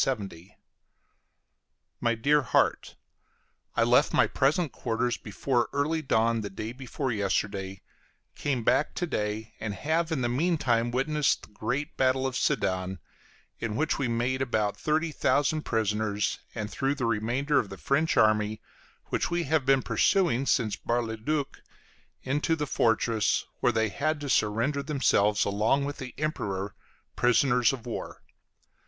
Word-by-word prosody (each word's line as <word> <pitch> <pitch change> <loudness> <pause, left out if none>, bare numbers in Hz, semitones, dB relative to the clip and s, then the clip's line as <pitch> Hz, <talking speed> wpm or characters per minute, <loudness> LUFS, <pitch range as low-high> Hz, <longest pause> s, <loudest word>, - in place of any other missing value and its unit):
My 115 -1 +1
Dear 145 +6 +3
Heart: 130 - +1 0.8
I - - +3
left - - +3
my - - +5
present 150 +4 +1
quarters 120 0 -1
before 120 +3 -1
early 150 +3 0
dawn 115 -4 +1
the 100 - -5
day 110 +3 -5
before 130 +1 -4
yesterday, 100 -2 -2 0.5
came 135 -5 -2
back 145 - +2
to 175 - -1
day, 105 -7 -3
and 105 -2 -4
have 160 +5 0
in 150 -5 0
the 120 - +1
mean 160 +8 +1
time 120 -4 +1
witnessed 140 +3 +1
the - - -11
great 125 +7 -3
battle 130 0 +2
of 130 -1 -2
Sedan, 95 -3 0 0.6
in 115 -2 -3
which 155 +5 0
we 135 - 0
made 120 +3 -1
about 110 -5 0
thirty 155 +2 0
thousand 150 +1 +1
prisoners, 105 -2 0 0.2
and 105 -2 -4
threw 135 +5 0
the 130 -4 -2
remainder 120 +6 +1
of 100 - -3
the 95 - -8
French 155 +8 +1
army, 110 0 +3 0.5
which - - 0
we 175 0 0
have 150 -2 0
been 135 -2 +4
pursuing 140 - +2
since 110 -5 +1
Bar 120 +3 -1
le 110 -1 -4
Duc, 140 +5 -3 0.6
into 145 +5 0
the 150 -2 -2
fortress, 115 -4 +1
where 120 - +3
they 110 -1 +1
had 155 +10 -1
to 145 - -4
surrender 115 +7 +1
themselves, 125 -8 +2
along 110 +8 +1
with 145 +1 -4
the 130 -3 -8
Emperor, 100 -10 -3 0.4
prisoners 125 -1 +3
of 130 -3 -7
war. 120 - -6
125 Hz, 150 wpm, -28 LUFS, 110-145 Hz, 0.8 s, my